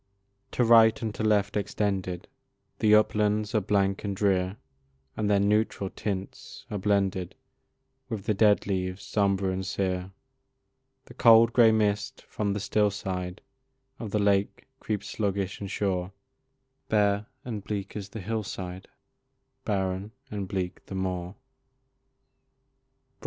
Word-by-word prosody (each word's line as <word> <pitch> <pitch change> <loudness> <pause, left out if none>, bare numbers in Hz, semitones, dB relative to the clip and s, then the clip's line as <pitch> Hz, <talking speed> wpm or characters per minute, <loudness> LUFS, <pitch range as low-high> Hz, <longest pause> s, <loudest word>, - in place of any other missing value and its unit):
To 125 - +2
right 115 -1 +6
and 110 -2 -2
to - - -6
left 105 -2 +2
extended 100 -3 -2 0.5
The 105 0 +5
uplands 105 0 +2
are 110 - +3
blank 100 -1 +1
and 100 -2 -2
drear, 95 -1 +1 0.6
And 105 -1 -1
their 100 -1 +4
neutral 100 -1 +1
tints 100 -2 -5
are 105 - -2
blended 95 -2 0 0.7
With 105 -3 -4
the 110 - +1
dead 105 0 +4
leaves 95 0 -2
sombre 100 -2 +1
and 95 +1 -3
sere; 95 -1 -2 1.0
The - - -13
cold 115 0 +6
grey 115 -2 +6
mist 105 -2 0
from 100 -2 -2
the 105 - -2
still 105 0 +2
side 95 -2 -4 0.6
Of 110 - -5
the 105 - 0
lake 100 -1 +1
creeps 105 -2 -3
sluggish 100 -2 -2
and 100 - -5
sure, 95 -2 -1 0.8
Bare 105 -1 +2 0.2
and 110 -5 -5
bleak 100 -2 -4
is 100 -2 -5
the 110 +1 -7
hill 110 +4 -2
side, 95 -2 -7 0.8
Barren 95 +1 -2 0.2
and 100 -2 -3
bleak 90 -1 -4
the 95 - -6
moor. 90 0 -3
100 Hz, 135 wpm, -27 LUFS, 95-105 Hz, 1.0 s, right